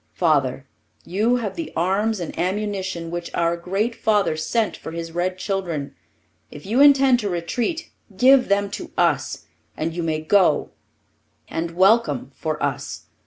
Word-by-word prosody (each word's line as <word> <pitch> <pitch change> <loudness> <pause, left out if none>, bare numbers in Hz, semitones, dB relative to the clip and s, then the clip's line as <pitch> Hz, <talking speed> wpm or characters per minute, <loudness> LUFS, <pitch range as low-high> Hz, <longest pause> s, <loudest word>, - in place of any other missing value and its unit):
Father, 140 -6 +1 0.4
you 215 +7 +1
have 225 -5 -3
the 330 -2 -5
arms 195 +5 +1
and 170 - -5
ammunition 190 -3 -2
which 175 0 -4
our 170 0 +1
great 195 +7 -1
father 210 -7 +1
sent 205 +9 -1
for - - -9
his 165 0 -5
red 180 +2 -1
children. 180 -7 -3 0.6
If 145 - -11
you 230 +7 +2
intend 275 -3 +6
to 210 -3 -2
retreat, 235 - -2 0.3
give 255 +3 +6
them 200 0 +1
to - - -6
us, - - 0 0.3
and 160 +1 -2
you 175 - -3
may 160 -2 -1
go, 170 -2 +3 0.8
and 165 +1 -3
welcome, 185 - +3
for 155 0 -3
us. 140 0 -3
185 Hz, 150 wpm, -22 LUFS, 165-215 Hz, 0.8 s, intend